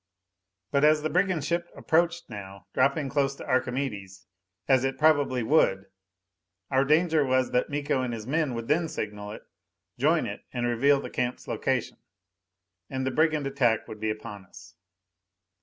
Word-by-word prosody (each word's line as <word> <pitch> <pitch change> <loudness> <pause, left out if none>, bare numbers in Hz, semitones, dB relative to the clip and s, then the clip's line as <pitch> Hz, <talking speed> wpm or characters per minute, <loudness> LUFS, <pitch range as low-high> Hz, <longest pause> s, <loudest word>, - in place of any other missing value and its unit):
But 140 0 +2
as 150 0 +5
the 155 - -1
brigand 180 -4 +1
ship 170 +2 -1
approached 170 +1 +1
now 100 -3 -9
dropping 140 +3 +2
close 140 0 0
to - - -9
Archimedes 110 -8 -2 0.4
as 130 -2 +4
it 135 0 -1
probably 145 -5 +3
would 100 -8 +2 0.8
our 130 0 +4
danger 155 +2 +3
was 130 -1 +1
that 125 - +1
Miko 145 -2 -1
and 125 -1 -2
his 110 -2 -6
men 145 -1 0
would 115 0 -5
then 165 +2 +2
signal 105 -4 -5
it, 105 - -9 0.6
join - - +3
it, - - -6
and 120 -1 -2
reveal 135 +4 +3
the - - -7
camp's 125 0 -3
location. - - -1 0.9
And 130 0 -3
the 130 - 0
brigand 155 0 +2
attack 130 -5 +1
would 110 - -9
be 110 - -1
upon 110 -2 -6
us! - - -15
135 Hz, 160 wpm, -27 LUFS, 115-150 Hz, 0.9 s, as